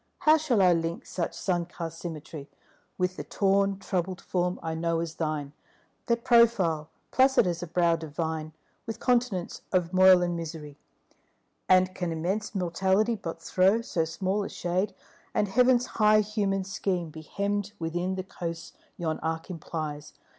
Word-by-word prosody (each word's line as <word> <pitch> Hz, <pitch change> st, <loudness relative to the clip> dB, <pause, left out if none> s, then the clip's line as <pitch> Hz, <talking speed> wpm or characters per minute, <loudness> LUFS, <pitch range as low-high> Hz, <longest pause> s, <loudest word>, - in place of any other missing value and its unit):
How 310 Hz, +1 st, +6 dB
shall 260 Hz, -10 st, +2 dB
I 180 Hz, -1 st, +6 dB
link 165 Hz, 0 st, -2 dB
such 170 Hz, -3 st, -3 dB
sun 175 Hz, -3 st, -1 dB
cast 165 Hz, -2 st, -7 dB
symmetry 155 Hz, -3 st, -7 dB, 0.5 s
With 180 Hz, 0 st, -1 dB
the -, -, -4 dB
torn 195 Hz, 0 st, +1 dB
troubled 185 Hz, -1 st, -2 dB
form 180 Hz, 0 st, -1 dB
I 160 Hz, -, -2 dB
know 165 Hz, 0 st, 0 dB
as 165 Hz, -1 st, -3 dB
thine, 155 Hz, -3 st, -3 dB, 0.5 s
That 235 Hz, 0 st, +1 dB
profile, 210 Hz, -11 st, +4 dB, 0.2 s
placid 265 Hz, -3 st, +4 dB
as 175 Hz, -1 st, -1 dB
a 175 Hz, -, -5 dB
brow 170 Hz, 0 st, +2 dB
divine, 160 Hz, 0 st, -4 dB, 0.4 s
With 225 Hz, -, -5 dB
continents 240 Hz, -8 st, 0 dB
of 180 Hz, -1 st, +1 dB
moil 185 Hz, -1 st, +7 dB
and 175 Hz, -1 st, -1 dB
misery? 160 Hz, -3 st, -6 dB, 0.9 s
And 185 Hz, 0 st, +5 dB
can 175 Hz, -2 st, -3 dB
immense 185 Hz, +7 st, -2 dB
Mortality 190 Hz, +5 st, +1 dB
but 165 Hz, -5 st, -7 dB
throw 195 Hz, +5 st, +3 dB
So 170 Hz, -7 st, -1 dB
small 190 Hz, +5 st, -1 dB
a -, -, -5 dB
shade, 180 Hz, +4 st, -2 dB, 0.4 s
and 210 Hz, -, +2 dB
Heaven's 250 Hz, +3 st, +4 dB
high 215 Hz, -2 st, +4 dB
human 200 Hz, -2 st, -1 dB
scheme 185 Hz, -3 st, -2 dB
Be 160 Hz, +1 st, -9 dB
hemmed 205 Hz, +4 st, -2 dB
within 175 Hz, +3 st, -2 dB
the 185 Hz, -, -3 dB
coasts 170 Hz, -3 st, -6 dB, 0.2 s
yon 160 Hz, -2 st, -2 dB
arc 160 Hz, +2 st, -3 dB
implies? 155 Hz, -3 st, -5 dB
180 Hz, 155 wpm, -28 LUFS, 165-200 Hz, 0.9 s, moil